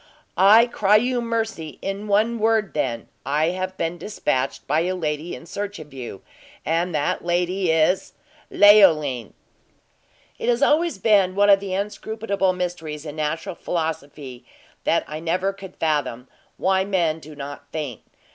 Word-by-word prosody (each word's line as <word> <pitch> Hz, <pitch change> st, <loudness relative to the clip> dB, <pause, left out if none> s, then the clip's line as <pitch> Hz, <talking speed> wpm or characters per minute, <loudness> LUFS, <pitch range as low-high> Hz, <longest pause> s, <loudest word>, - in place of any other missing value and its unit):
"I 215 Hz, +5 st, +7 dB
cry 210 Hz, -4 st, +2 dB
you 245 Hz, +3 st, +2 dB
mercy! 225 Hz, -9 st, -3 dB
In 195 Hz, +2 st, -4 dB
one 220 Hz, +3 st, +2 dB
word, 220 Hz, -2 st, +1 dB
then, 120 Hz, -6 st, -2 dB, 0.2 s
I 150 Hz, +4 st, +1 dB
have 185 Hz, +1 st, -4 dB
been 165 Hz, +1 st, -2 dB
dispatched 130 Hz, -, -2 dB
by 150 Hz, +3 st, +1 dB
a 180 Hz, +3 st, 0 dB
lady 155 Hz, -1 st, -3 dB
in -, -, -11 dB
search 205 Hz, +3 st, -5 dB
of 150 Hz, -3 st, -11 dB
you, 120 Hz, -7 st, -8 dB, 0.4 s
and 165 Hz, +1 st, 0 dB
that 145 Hz, -, -1 dB
lady 180 Hz, +1 st, 0 dB
is 160 Hz, +3 st, +2 dB, 0.4 s
Leoline." 160 Hz, -, +5 dB, 1.1 s
It -, -, -1 dB
has 240 Hz, +3 st, +2 dB
always 320 Hz, -, +2 dB
been 195 Hz, -3 st, +3 dB
one 205 Hz, 0 st, +5 dB
of 195 Hz, -, +6 dB
the 195 Hz, -1 st, -4 dB
inscrutable 200 Hz, -1 st, -1 dB
mysteries 170 Hz, -4 st, -4 dB
in 150 Hz, -1 st, -7 dB
natural 155 Hz, +3 st, -2 dB
philosophy 145 Hz, -7 st, -4 dB, 0.4 s
that -, -, +2 dB
I 155 Hz, +1 st, -6 dB
never 180 Hz, +4 st, -1 dB
could 195 Hz, -1 st, -11 dB
fathom, 140 Hz, -6 st, -1 dB, 0.3 s
why 190 Hz, 0 st, +2 dB
men 175 Hz, -5 st, 0 dB
do 155 Hz, 0 st, -12 dB
not 145 Hz, 0 st, -8 dB
faint. 145 Hz, -7 st, -5 dB
180 Hz, 150 wpm, -23 LUFS, 150-200 Hz, 1.1 s, I